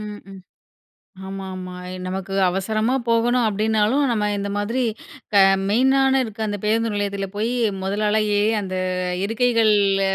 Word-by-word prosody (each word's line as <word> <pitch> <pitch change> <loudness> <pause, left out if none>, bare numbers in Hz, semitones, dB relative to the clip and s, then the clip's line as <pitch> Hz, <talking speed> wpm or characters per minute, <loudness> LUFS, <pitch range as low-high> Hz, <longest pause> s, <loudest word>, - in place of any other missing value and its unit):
ம் 210 -1 -7
ம். 195 -1 -11 0.9
ஆமா 195 0 -6
ஆமா. 185 -1 -7
அ - - -7 0.2
நமக்கு 190 +1 -5 0.2
அவசரமா 215 +6 -1 0.2
போகணும் 240 +2 +2
அப்பிடினாலும் 220 +5 +1
நம்ம 210 -2 0
இந்த 200 0 -3
மாதிரி 230 +5 -1 0.5
க - - 0 0.3
மெயினான 265 +3 +3
இருக்க 220 -1 -7
அந்த 205 0 -3
பேருந்து 225 0 +1
நிலையத்தில 200 -1 -2
போய் 220 +3 -1 0.3
முதல் 200 +3 -2
ஆளா 215 +1 +2 0.2
ஏறி 215 +2 +2
அந்த 185 -1 -5 0.5
இருக்கைகள்ல 215 -3 +2
210 Hz, 140 wpm, -22 LUFS, 195-230 Hz, 0.9 s, மெயினான